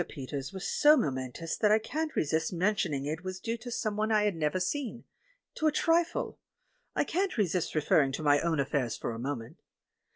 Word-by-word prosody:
Peters 135 -1 -5
was 190 -1 -5
so 300 +1 +5
momen 130 - -1
tous 165 +4 -4
that 210 - +3
I 215 - +6
can't 310 +8 -3
resist 160 +2 0
mentioning 175 -6 0
it 155 +4 -3
was 185 0 -5
due 230 +3 -2
to 245 +2 -8
someone 215 -2 -1
I 215 -1 +4
had 205 -3 +1
never 160 +3 0
seen 240 +4 -2 0.3
— - - -40
to 315 - +2
a - - +4
trifle; 335 +3 +1 0.6
I - - +3
can't 380 -1 -1
resist 180 -6 0
referring 150 -2 +3
to 155 - -3
my 145 -1 +5
own 165 -1 0
affairs 135 -4 0
for - - -3
a 115 - -6
moment. 125 -3 -5
180 Hz, 200 wpm, -30 LUFS, 145-225 Hz, 0.6 s, I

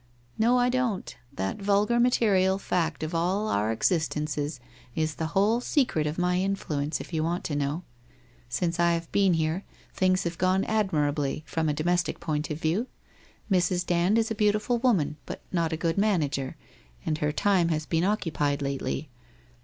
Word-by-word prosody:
' - - -34
No, 240 +3 +4
I 245 0 +3
don't. 245 -6 -1 0.2
That 95 - -3
vulgar 205 +4 +2
material 200 -6 +3
fact 165 -5 -1
of 155 +2 -4
all 185 +6 0
our 105 - +1
existences 150 +2 -1 0.4
is 155 -1 0
the 160 - -3
whole 215 +4 +4
secret 245 - +1
of 150 - -3
my 180 0 +1
influence, 160 -6 -1
if - - -9
you 155 -1 0
want 170 +2 -1
to 150 - -3
know. 145 +4 -1 0.7
Since 170 +7 -1
I 170 0 +4
have 165 0 -3
been 195 -3 +3
here, 160 +4 -1 0.3
things 185 0 +2
have 170 -1 -4
gone 185 +1 +2
ad 215 -2 +1
mirably, 145 -1 0
from 160 +1 -1
a - - +1
domestic 175 +3 0
point 150 -2 -2
of 150 0 -4
view. 175 +10 0 0.6
Mrs. 180 -1 +2
Dand 175 +5 +2
is 225 0 +1
a - - +2
beautiful 210 +3 +1
woman, 195 - +2
but - - -7
not 170 -2 0
a 160 - -1
good 165 +3 0
manager, 150 -10 0 0.5
and 155 -1 -1
her 150 0 +1
time 180 +1 +2
has 155 -1 -1
been 165 +1 0
occupied 150 -8 0
lately. 140 +1 -3
170 Hz, 175 wpm, -27 LUFS, 155-195 Hz, 0.7 s, No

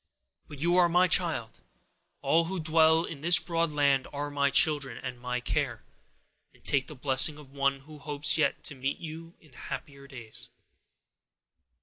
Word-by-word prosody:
But 145 - -11
you 170 +5 +1
are 175 -1 +5
my 180 +2 +3
child: 160 -11 0 0.6
all 165 +1 +3
who 190 +2 -3
dwell 160 0 +3
in 155 -5 -8
this 170 +2 +6
broad 165 0 -1
land 140 -3 +1
are 145 0 -5
my 140 -1 +1
children, 145 -1 +3
and 125 -1 -7
my 125 0 -3
care; 125 -2 -3 0.7
and - - -25
take 135 -2 +1
the 150 - -9
blessing 135 +3 +3
of 145 -3 -14
one 140 -1 -1
who 150 +2 -14
hopes 145 +1 -1
yet 155 - 0
to - - -5
meet 135 +1 -3
you 165 +1 -9
in 155 -5 -23
happier 140 +2 -8
days." 120 -5 -8
145 Hz, 165 wpm, -28 LUFS, 135-160 Hz, 0.7 s, this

